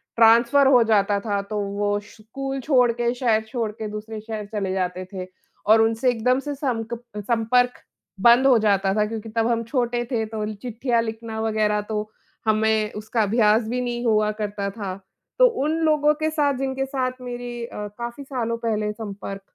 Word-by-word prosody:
Transfer 235 Hz, +5 st, +5 dB
हो 250 Hz, -3 st, +6 dB
जाता 205 Hz, -2 st, +2 dB
था, 200 Hz, -1 st, -1 dB
तो 210 Hz, +1 st, -4 dB
वो 205 Hz, +1 st, -1 dB
स्कूल 250 Hz, +6 st, -6 dB
छोड़ 250 Hz, -3 st, +4 dB
के, 240 Hz, +1 st, -1 dB
शहर 235 Hz, -3 st, +1 dB
छोड़ 225 Hz, -2 st, -2 dB
के 215 Hz, 0 st, -6 dB
दूसरे 215 Hz, +1 st, -6 dB
शहर 215 Hz, -1 st, -5 dB
चले 195 Hz, -3 st, -1 dB
जाते 185 Hz, 0 st, -2 dB
थे 185 Hz, -1 st, -5 dB, 0.4 s
और 220 Hz, +1 st, +6 dB
उनसे 225 Hz, +3 st, +2 dB
एकदम 250 Hz, +3 st, +1 dB
से 290 Hz, +1 st, -4 dB
संक 240 Hz, -5 st, -2 dB, 0.2 s
संपर्क 235 Hz, +3 st, +1 dB, 0.4 s
बंद 240 Hz, +4 st, +6 dB
हो 250 Hz, -3 st, +6 dB
जाता 195 Hz, -2 st, +2 dB
था 210 Hz, 0 st, +2 dB
क्योंकि 225 Hz, 0 st, -6 dB
तब 225 Hz, +1 st, 0 dB
हम 230 Hz, -1 st, 0 dB
छोटे 240 Hz, 0 st, -1 dB
थे, 225 Hz, -2 st, 0 dB
तो 215 Hz, -1 st, -4 dB
चिट्ठियाँ 235 Hz, +2 st, -1 dB
लिखना 225 Hz, 0 st, -5 dB
वगैरह, 215 Hz, -1 st, +1 dB
तो 210 Hz, 0 st, -4 dB, 0.4 s
हमें 215 Hz, 0 st, +2 dB
उसका 220 Hz, +2 st, -1 dB
अभ्यास 215 Hz, +1 st, +3 dB
भी 250 Hz, +2 st, -1 dB
नहीं 240 Hz, 0 st, -3 dB
हुआ 215 Hz, -1 st, +3 dB
करता 205 Hz, -2 st, -3 dB
था। 195 Hz, -3 st, -5 dB, 0.4 s
तो -, -, +8 dB, 0.2 s
उन 305 Hz, -, +1 dB
लोगों 300 Hz, -1 st, +4 dB
के 315 Hz, 0 st, +1 dB
साथ, 295 Hz, -2 st, +1 dB
जिनके 270 Hz, 0 st, -2 dB
साथ 260 Hz, -2 st, -1 dB
मेरी 245 Hz, -1 st, -6 dB
अ, 210 Hz, -3 st, -6 dB
काफ़ी 240 Hz, +4 st, -6 dB
सालों 235 Hz, -4 st, -2 dB
पहले 215 Hz, -2 st, -1 dB
संपर्क 200 Hz, -2 st, -7 dB
225 Hz, 180 wpm, -23 LUFS, 210-245 Hz, 0.4 s, तो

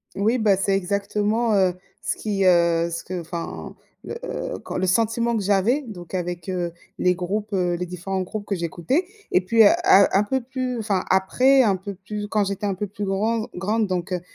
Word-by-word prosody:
Oui, 220 Hz, +5 st, +2 dB
bah, 215 Hz, -4 st, +3 dB
c'est 195 Hz, 0 st, +1 dB
exactement, 205 Hz, +4 st, 0 dB
heu, 190 Hz, -2 st, +3 dB, 0.3 s
ce -, -, -1 dB
qui, 200 Hz, -3 st, -1 dB
heu, 170 Hz, -2 st, +4 dB
ce 170 Hz, -, -4 dB
que 185 Hz, 0 st, -5 dB
enfin, 170 Hz, 0 st, -6 dB, 0.3 s
le -, -, -6 dB
heu, -, -, -4 dB
quand -, -, -6 dB
le 185 Hz, -, 0 dB
sentiment 230 Hz, +5 st, +1 dB
que 220 Hz, -, 0 dB
j'avais, 205 Hz, +8 st, +2 dB
donc 175 Hz, -5 st, -10 dB
avec, 175 Hz, -1 st, -3 dB
heu, 175 Hz, -2 st, -2 dB, 0.3 s
les 180 Hz, 0 st, +3 dB
groupes, 205 Hz, +4 st, -3 dB
heu, 180 Hz, -2 st, +1 dB
les 180 Hz, +1 st, -3 dB
différents 190 Hz, +2 st, -3 dB
groupes 205 Hz, +3 st, -5 dB
que 205 Hz, -, -2 dB
j'écoutais 175 Hz, -, -1 dB, 0.2 s
et 180 Hz, -, +4 dB
puis, 225 Hz, +5 st, +4 dB
heu, 205 Hz, -, +8 dB, 0.2 s
un 195 Hz, +1 st, +7 dB
un 195 Hz, -, +3 dB
peu 260 Hz, +5 st, -1 dB
plus 255 Hz, 0 st, -3 dB
enfin, 205 Hz, -4 st, -1 dB
après 255 Hz, +8 st, +4 dB
un 205 Hz, -5 st, +3 dB
peu 195 Hz, +2 st, -7 dB
plus 205 Hz, +2 st, -6 dB
quand 210 Hz, 0 st, +1 dB
j'étais 200 Hz, +1 st, -2 dB
un 195 Hz, -, -1 dB
peu 205 Hz, -, -3 dB
plus 205 Hz, +1 st, -5 dB
granz 215 Hz, +3 st, 0 dB
grande 210 Hz, +4 st, 0 dB
donc, 185 Hz, 0 st, -3 dB
heu, 180 Hz, -, -2 dB
195 Hz, 210 wpm, -23 LUFS, 180-215 Hz, 0.3 s, heu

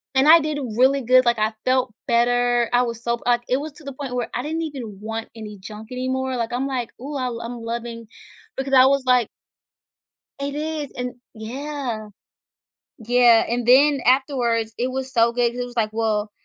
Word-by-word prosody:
And 265 Hz, +3 st, +4 dB
I 330 Hz, +1 st, +9 dB
did 305 Hz, -1 st, -2 dB, 0.2 s
really 270 Hz, +2 st, +4 dB
good, 255 Hz, +2 st, +5 dB
like, 240 Hz, -1 st, +2 dB
I 215 Hz, +1 st, 0 dB
felt 255 Hz, -2 st, +1 dB
better, 240 Hz, 0 st, +2 dB
I 245 Hz, -, +5 dB
was 235 Hz, -1 st, -4 dB
so, 235 Hz, 0 st, -1 dB
like, 240 Hz, -1 st, +3 dB
it 255 Hz, -, +2 dB
was 295 Hz, +1 st, -6 dB
to 305 Hz, -, -16 dB
the 275 Hz, -1 st, -7 dB
point 260 Hz, -2 st, -6 dB
where 245 Hz, -2 st, -1 dB
I 245 Hz, -, -1 dB
didn't 320 Hz, +4 st, -3 dB
even 250 Hz, -10 st, -6 dB
want 225 Hz, +1 st, -5 dB
any 210 Hz, -2 st, -9 dB
junk 215 Hz, +4 st, -10 dB
anymore, 260 Hz, +1 st, -2 dB
like, 235 Hz, 0 st, -2 dB
I'm 250 Hz, +2 st, -1 dB
like, 250 Hz, -3 st, -3 dB
"Ooh, 285 Hz, +3 st, -6 dB
I'll 250 Hz, -3 st, -3 dB
I'm 235 Hz, 0 st, -6 dB
loving" 230 Hz, 0 st, -5 dB, 0.5 s
because 270 Hz, 0 st, -3 dB
I 260 Hz, 0 st, +8 dB
was 275 Hz, -1 st, +2 dB
like 250 Hz, -3 st, +3 dB, 1.1 s
It 280 Hz, 0 st, -3 dB
is, 305 Hz, -1 st, -4 dB
and 250 Hz, 0 st, -4 dB, 0.2 s
yeah. 245 Hz, 0 st, -5 dB, 0.9 s
Yeah, 240 Hz, 0 st, +4 dB
and 240 Hz, 0 st, -1 dB
then 280 Hz, +3 st, +5 dB
afterwards, 245 Hz, -4 st, +2 dB
it 250 Hz, +2 st, 0 dB
was 265 Hz, 0 st, -4 dB
so 235 Hz, -2 st, +3 dB
good, 240 Hz, 0 st, +1 dB
'cause 245 Hz, -, -6 dB
it -, -, -1 dB
was 245 Hz, 0 st, -11 dB
like, 215 Hz, -2 st, +1 dB
"Well," 215 Hz, -2 st, -1 dB
245 Hz, 195 wpm, -22 LUFS, 230-265 Hz, 1.1 s, I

